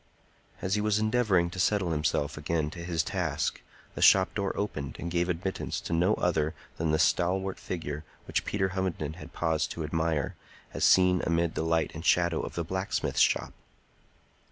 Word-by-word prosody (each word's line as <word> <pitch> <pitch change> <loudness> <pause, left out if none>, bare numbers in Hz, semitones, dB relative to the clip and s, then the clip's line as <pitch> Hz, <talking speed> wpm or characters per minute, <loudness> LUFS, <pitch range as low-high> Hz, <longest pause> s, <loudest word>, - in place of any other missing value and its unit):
As 95 - 0
he 105 - +2
was 105 -1 +2
endeavoring 110 -6 +2
to 95 - -7
settle 95 -2 +2
himself 75 -1 0
again 75 0 -1
to 85 0 -8
his 85 -3 0
task, - - -2 0.3
the - - -6
shop 95 0 +6
door 100 -2 -1
opened 75 -10 -3
and 85 - -5
gave 85 +1 +1
admittance 90 +2 -2
to - - -4
no 90 +6 +3
other 80 -3 0 0.2
than 80 0 -1
the 80 - +3
stalwart 95 +4 +1
figure 75 -4 -5 0.2
which - - -1
Peter 95 -2 0
Hovenden 90 -4 -3
had 80 - -10
paused 80 -2 0
to 80 - -4
admire, 80 -1 -1 0.4
as - - -3
seen 90 -1 +5
amid 85 0 +1
the - - -2
light 80 0 +1
and 80 +1 -7
shadow 85 -2 +3
of - - -6
the 85 - -1
blacksmith's 95 +4 -2
shop. - - +2
85 Hz, 180 wpm, -29 LUFS, 80-95 Hz, 0.4 s, shop